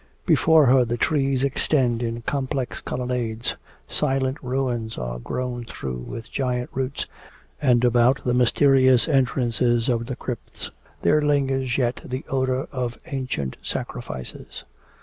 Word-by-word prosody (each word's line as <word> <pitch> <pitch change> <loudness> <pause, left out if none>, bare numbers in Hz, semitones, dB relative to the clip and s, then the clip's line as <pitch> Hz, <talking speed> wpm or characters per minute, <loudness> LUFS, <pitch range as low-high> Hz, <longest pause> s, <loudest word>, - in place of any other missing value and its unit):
Before 160 -2 +5
her 130 0 +6
the 120 0 -2
trees 135 -2 +1
extend 130 -3 +1
in 115 0 -3
complex 130 -1 -2
colonnades, 125 -2 -2 0.3
silent 135 0 0
ruins 125 -3 -2
are - - -4
grown 125 - -3
through 65 - -5
with 115 - -8
giant 125 -2 -1
roots, 130 +1 -2 0.6
and 125 -4 +4
about 120 +2 +4
the 125 - +1
mysterious 130 0 +5
entrances 125 -4 +2
of 115 -1 0
the 130 - -3
crypts 125 -1 -6 0.3
there 150 0 +4
lingers 135 -3 +1
yet 125 -2 0
the 130 +1 -5
odour 130 0 0
of 125 -3 -3
ancient 130 - -3
sacrifices. 65 -1 -6
125 Hz, 130 wpm, -24 LUFS, 120-135 Hz, 0.6 s, her